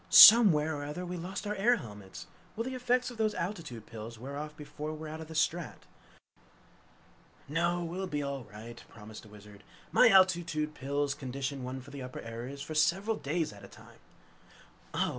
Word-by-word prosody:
"Somewhere 160 -10 +9
or - - -5
other 150 +5 -5
we 180 0 -5
lost 185 +4 -5
our 210 - -1
air 215 +5 +3
helmets. 105 - -9 0.3
Will 230 - -2
the 260 +2 -4
effects 250 0 0
of 240 - -11
those 215 -1 +1
altitude 165 - -5
pills 115 0 -8
wear 135 +5 -7
off 150 +1 -6
before 150 +1 -6
we're 155 0 -7
out 155 +1 -7
of 160 - -8
the 160 - -9
strat?" 165 +2 -1 1.6
"No, 170 +4 0
we'll 180 +3 -4
be 145 -4 -2
all 140 -2 -4
right," 115 +3 -11
promised 110 -1 -11
the 110 - -15
Wizard. 105 -1 -14 0.3
"My 250 - +7
altitude 175 -6 +3
pills 140 0 -1
condition 135 0 -4
one 130 +1 -5
for 135 +3 -13
the 140 -1 -7
upper 125 0 -7
areas 120 +5 -7
for 155 - -6
several 175 +8 +2
days 155 - -2
at 100 - -14
a - - -9
time!" - - -16 0.9
"Oh! - - 0
150 Hz, 185 wpm, -31 LUFS, 130-180 Hz, 1.6 s, Somewhere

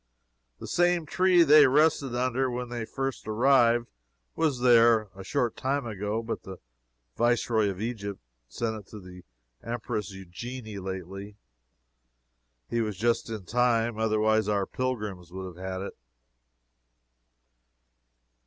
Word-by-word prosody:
The - - -9
same 175 -1 +2
tree 180 +2 +4
they 150 -2 +7
rested 140 -2 +2
under 130 +1 0
when 125 0 -4
they 120 -2 -4
first 135 -2 -4
arrived, 120 +1 +4 0.5
was 145 -6 0
there 115 -3 +5
a 95 - -9
short 120 +3 -1
time 135 +1 -1
ago, 105 +1 -3
but 115 - -4
the 95 -1 -9 0.6
Viceroy 120 -3 +2
of 95 -1 -5
Egypt 105 -3 -4 0.3
sent 110 - -3
it 105 -3 -10
to 105 - -10
the 90 -1 -12 0.4
Empress 115 -2 -4
Eugenie 105 +4 -8
lately. 95 +2 -7 1.3
He 115 - -1
was 105 -4 -3
just 115 +3 0
in 110 -4 -6
time, 120 0 +1
otherwise 110 -1 +2
our 100 -2 +1
pilgrims 105 -10 -4
would 95 +1 -6
have 90 0 -9
had 95 0 -4
it. - - -7
115 Hz, 130 wpm, -27 LUFS, 100-125 Hz, 1.3 s, they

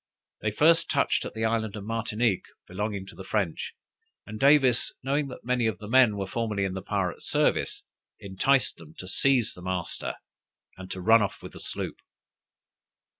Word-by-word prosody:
They 105 - 0
first 165 +9 +4
touched 140 - +1
at - - -7
the 110 0 -1
island 110 -2 0
of 105 - -6
Martinique, 115 -2 -1 0.2
belonging 100 +1 -3
to 95 - -11
the 95 - -9
French, 95 -4 -2 0.5
and 110 +2 -8
Davis 135 -3 +4
knowing 140 +2 0
that 125 - -10
many 125 -2 +1
of 110 -5 -1
the 105 - -9
men 120 -3 +5
were 100 - -2
formerly 105 0 -2
in 95 - -2
the 95 - -4
pirate 95 -3 -2
service, - - +1 0.4
enticed 105 +8 +1
them 80 -1 -14
to 95 - -8
seize 125 +3 +2
the 90 - -12
master, 90 -1 -3 0.6
and 95 0 -10
to 95 - -5
run 110 +4 +6
off 100 - -3
with - - -8
the - - -7
sloop. - - -3
105 Hz, 175 wpm, -27 LUFS, 95-125 Hz, 0.6 s, run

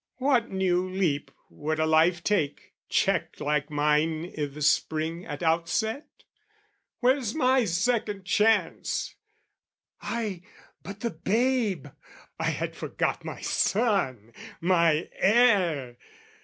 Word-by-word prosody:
What 255 -3 +2
new 185 -1 0
leap 180 -7 -1 0.2
would 155 +1 -3
a 155 - +2
life 165 +2 +3
take, 160 -9 -1 0.2
checked - - 0
like 150 0 -1
mine 150 +3 0
I' 150 - -1
the 145 +1 -7
spring 160 +3 0
at 145 +2 -6
outset? 170 - 0 0.9
Where's 250 -3 +2
my 260 -4 +3
second 205 +1 -1
chance? 220 +4 +1 0.9
Ay, 215 -6 -3 0.4
but 200 +4 -9
the 235 - -1
babe...I 210 - -2
had - - -3
forgot - - -2
my - - -7
son, 170 - 0 0.3
My 170 -2 +2
heir! 185 - +3
180 Hz, 105 wpm, -27 LUFS, 155-220 Hz, 0.9 s, life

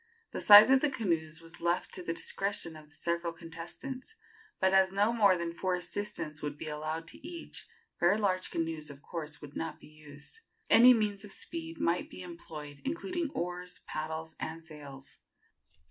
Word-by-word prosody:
The - - -3
size 210 +4 +11
of 265 0 +6
the 300 - +3
canoes 165 - -1
was 165 +1 -8
left 170 +1 0
to 185 - -4
the 170 - -2
discretion 185 -1 -1
of 155 -1 -12
the 145 - -15
several 170 0 -1
contestants, 175 - -7 0.4
but 190 0 +3
as 190 0 +5
no 205 +4 +3
more 200 -5 +5
than 170 -1 -3
four 180 +1 0
assistants 175 -3 -3
would 150 0 -4
be 160 - -6
allowed 155 +2 -3
to - - -11
each, 335 +1 -6 0.3
very 175 +4 +4
large 185 -3 +1
canoes, 160 -2 -2
of 140 0 -11
course, 155 -4 -6
would 145 0 -10
not 165 - -4
be - - -14
used. 150 - -10 0.3
Any 250 +2 +9
means 210 -2 0
of 210 - -8
speed 165 -3 -4
might 170 +1 +1
be 185 - -8
employed, 150 -4 -9
including 340 +2 -2
oars, 180 +1 -4
paddles 160 +1 -4
and 160 +1 -5
sails. 140 -4 -9
170 Hz, 175 wpm, -31 LUFS, 155-200 Hz, 0.4 s, size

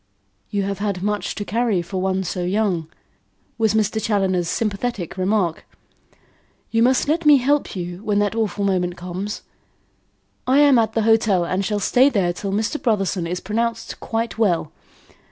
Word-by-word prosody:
"You 200 -2 -1
have 200 0 -3
had 200 -3 -2
much 210 0 -2
to 205 - -4
carry 220 -5 0
for 185 +2 -4
one 190 0 0
so 180 +1 -3
young," 185 -3 0 0.7
was 220 -1 +2
Mr. 220 0 +1
Challoner's 190 -5 +1
sympathetic 210 -3 -2
remark. 185 -3 0 1.1
"You 225 - +2
must 255 +3 +3
let 325 +3 +1
me 300 -2 +7
help 280 +1 0
you 175 +1 -6
when 210 -2 0
that 205 0 +1
awful 210 -3 -1
moment 180 -2 0
comes. 185 +4 -5 1.0
I 260 +2 +4
am 285 -4 +6
at 225 - +1
the 225 - +1
hotel 215 -5 +3
and 185 +3 -1
shall 210 +1 -1
stay 250 +7 +4
there 190 -8 +1
till 195 +2 -4
Mr. 215 +8 -1
Brotherson 195 -6 0
is 180 +1 -3
pronounced 225 +4 -3
quite 225 0 -3
well. 175 -8 +1
205 Hz, 165 wpm, -21 LUFS, 185-225 Hz, 1.1 s, me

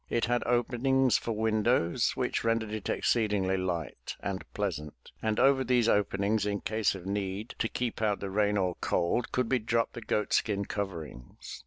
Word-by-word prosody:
It 115 - +1
had 120 0 +1
openings 125 -1 +2
for 115 - -3
windows 110 -5 +1
which - - -1
rendered 115 -1 0
it 110 -2 -4
exceedingly 105 -5 +1
light 90 -6 -3
and 95 -1 -4
pleasant, 80 -8 -4
and 110 -1 0
over 135 +1 +4
these 125 -3 +2
openings 105 0 +2
in 100 -1 -1
case 110 -2 0
of 90 -2 -9
need 100 +2 -3
to 115 - 0
keep 120 -3 -3
out 105 -2 +1
the 100 -1 -5
rain 105 +1 +2
or 90 -2 +1
cold 90 +8 0
could 125 -2 0
be 130 0 +2
dropped 115 +1 0
the 120 - -7
goat 105 -1 -1
skin 100 -2 +1
coverings. 85 -12 -6
105 Hz, 175 wpm, -30 LUFS, 95-115 Hz, -, over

